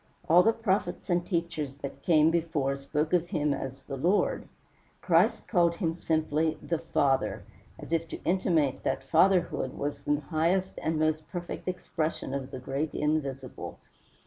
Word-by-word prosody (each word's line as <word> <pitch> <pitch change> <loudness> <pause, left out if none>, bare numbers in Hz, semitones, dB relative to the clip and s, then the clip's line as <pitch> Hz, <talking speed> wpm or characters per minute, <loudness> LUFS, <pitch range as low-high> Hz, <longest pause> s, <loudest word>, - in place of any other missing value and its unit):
All 170 +3 +7
the 225 - +4
prophets 195 -6 -1
and 175 0 +2
teachers 165 -6 -2
that 140 -1 -7
came 160 -1 +4
before 160 -5 0
spoke 150 +3 -2
of 175 -1 +3
him 150 -3 0
as 135 -1 -5
"the 135 - -6
Lord." 180 +9 +1 0.5
Christ - - +2
called 170 -3 +3
him 165 -3 -1
simply 160 -1 0
"THE 165 -2 -2
FATHER," 140 -4 +1 0.3
as - - -7
if 165 0 +1
to - - -8
intimate 170 -6 +1
that - - -1
Fatherhood 170 -3 +2
was 145 0 -3
the 145 +1 +1
highest 170 +5 0
and 160 0 0
most 155 0 0
perfect 175 0 -6
expression 165 -6 -3
of 135 -1 -3
the 130 - -6
great 135 +4 -3
Invisible. 140 -4 -2
155 Hz, 155 wpm, -29 LUFS, 140-175 Hz, 0.5 s, All